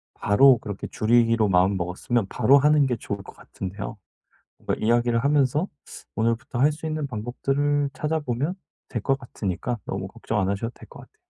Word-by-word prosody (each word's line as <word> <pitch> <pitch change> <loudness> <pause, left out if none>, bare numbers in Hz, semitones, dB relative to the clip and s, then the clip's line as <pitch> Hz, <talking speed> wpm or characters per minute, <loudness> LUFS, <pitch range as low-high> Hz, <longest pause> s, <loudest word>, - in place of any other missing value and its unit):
바로 125 +5 +5
그렇게 105 -2 -6
줄이기로 115 -1 +3
마음 95 +2 +3
먹었으면 95 +6 -1
바로 140 +2 +5
하는 150 0 +4
게 125 - 0
좋을 100 -2 -5
것 - - -13
같은데요. 100 +3 -7 0.6
뭔가 - - -1
이야기를 120 +1 +3
하면서 145 +3 +2 0.5
오늘부터 115 +2 -1
할 145 - +5
수 155 +2 -7
있는 155 -2 -2
방법들을 140 +5 -1
찾아 155 +1 -1
보면 140 +5 -2 0.3
될 120 - -4
것 135 +4 +1
같으니까 115 -2 -4
너무 95 0 -3
걱정 110 +1 -4
안 95 - 0
하셔도 100 +4 -2
될 - - -15
것 - - -12
같아요. - - -18
120 Hz, 375 characters per minute, -24 LUFS, 105-140 Hz, 0.6 s, 바로